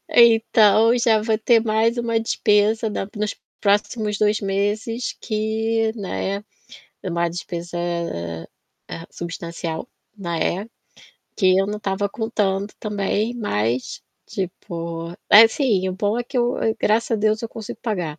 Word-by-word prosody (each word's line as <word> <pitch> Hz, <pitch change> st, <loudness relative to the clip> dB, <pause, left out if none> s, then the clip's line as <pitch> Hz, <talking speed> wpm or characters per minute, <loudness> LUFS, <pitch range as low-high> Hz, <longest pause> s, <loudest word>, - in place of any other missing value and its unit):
Então 225 Hz, -1 st, +6 dB
já 225 Hz, -3 st, +3 dB
vou 220 Hz, 0 st, +1 dB
ter 230 Hz, +1 st, +4 dB
mais 225 Hz, +1 st, +1 dB
uma 235 Hz, -1 st, 0 dB
despesa 220 Hz, 0 st, +2 dB
da 200 Hz, -, -3 dB
nos 210 Hz, 0 st, -2 dB, 0.2 s
próximos 210 Hz, +1 st, +1 dB
2 210 Hz, +1 st, +2 dB
meses 210 Hz, +4 st, -1 dB
que, 220 Hz, +1 st, 0 dB
né, 200 Hz, -1 st, -3 dB, 0.6 s
uma 170 Hz, -2 st, 0 dB
despesa, 175 Hz, 0 st, -6 dB, 1.1 s
eh, 165 Hz, -, -8 dB
substancial, 170 Hz, -1 st, -5 dB, 0.3 s
né, 175 Hz, +1 st, -2 dB, 0.7 s
que 185 Hz, -2 st, +4 dB
eu 195 Hz, -, +2 dB
não 210 Hz, +1 st, -3 dB
estava 200 Hz, 0 st, -1 dB
contando 205 Hz, -3 st, -1 dB
também, 210 Hz, +2 st, -1 dB
mas, 120 Hz, -, -2 dB, 0.2 s
tipo 170 Hz, -4 st, -5 dB, 0.2 s
assim, 220 Hz, -2 st, +6 dB
o -, -, -2 dB
bom 205 Hz, +4 st, 0 dB
é 240 Hz, -, -2 dB
que 255 Hz, -, -7 dB
eu 240 Hz, 0 st, +1 dB, 0.2 s
graças 225 Hz, +2 st, +1 dB
a -, -, +4 dB
Deus, 215 Hz, 0 st, +2 dB
eu 230 Hz, -, -4 dB
consigo 220 Hz, -2 st, -8 dB
pagar, 175 Hz, -9 st, -3 dB
210 Hz, 130 wpm, -22 LUFS, 190-225 Hz, 1.1 s, Então